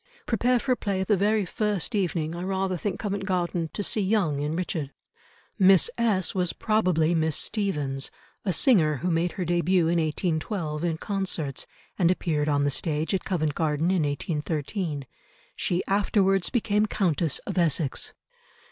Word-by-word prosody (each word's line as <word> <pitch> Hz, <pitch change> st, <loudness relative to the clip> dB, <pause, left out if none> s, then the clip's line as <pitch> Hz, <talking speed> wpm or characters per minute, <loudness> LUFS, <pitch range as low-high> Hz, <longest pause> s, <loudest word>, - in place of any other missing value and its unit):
"Prepare 245 Hz, +2 st, +2 dB
for 255 Hz, +2 st, -1 dB
a -, -, +4 dB
play 195 Hz, -4 st, -1 dB
the 210 Hz, +2 st, +2 dB
very 205 Hz, +1 st, +2 dB
first 210 Hz, +3 st, -1 dB
evening, 170 Hz, -5 st, 0 dB
I 175 Hz, -, -5 dB
rather 190 Hz, 0 st, -1 dB
think 195 Hz, +2 st, -3 dB
Covent 200 Hz, -2 st, -2 dB
Garden, 175 Hz, -3 st, -1 dB
to 205 Hz, -, -3 dB
see 210 Hz, -, +1 dB
Young 190 Hz, -8 st, +1 dB
in 150 Hz, +2 st, -2 dB
Richard." 165 Hz, -5 st, -2 dB, 0.7 s
Miss 190 Hz, -1 st, +5 dB
S—— 210 Hz, -7 st, +1 dB
was 180 Hz, -2 st, 0 dB
probably 180 Hz, -7 st, +2 dB
Miss 160 Hz, -2 st, +1 dB
Stephens, 150 Hz, -11 st, -1 dB, 0.3 s
a 195 Hz, -, 0 dB
singer 175 Hz, -, +4 dB
who 180 Hz, -, +2 dB
made 170 Hz, +1 st, +1 dB
her 185 Hz, -, -3 dB
debut 175 Hz, +1 st, +2 dB
in 170 Hz, +1 st, +2 dB
1812 160 Hz, 0 st, -2 dB
in 165 Hz, -2 st, 0 dB
concerts, 180 Hz, -8 st, -2 dB, 0.3 s
and 175 Hz, -2 st, +4 dB
appeared 155 Hz, -4 st, 0 dB
on 145 Hz, -1 st, +2 dB
the 145 Hz, -, +1 dB
stage 155 Hz, +4 st, -1 dB
at 190 Hz, -, -1 dB
Covent 155 Hz, -5 st, 0 dB
Garden 160 Hz, +2 st, 0 dB
in 185 Hz, -3 st, +2 dB
1813; 150 Hz, -, -2 dB, 0.5 s
she 175 Hz, 0 st, -1 dB
afterwards 195 Hz, -1 st, +2 dB
became 215 Hz, -3 st, +1 dB
Countess 170 Hz, -7 st, +1 dB
of -, -, -2 dB
Essex. 155 Hz, -4 st, 0 dB
175 Hz, 160 wpm, -26 LUFS, 155-200 Hz, 0.7 s, Miss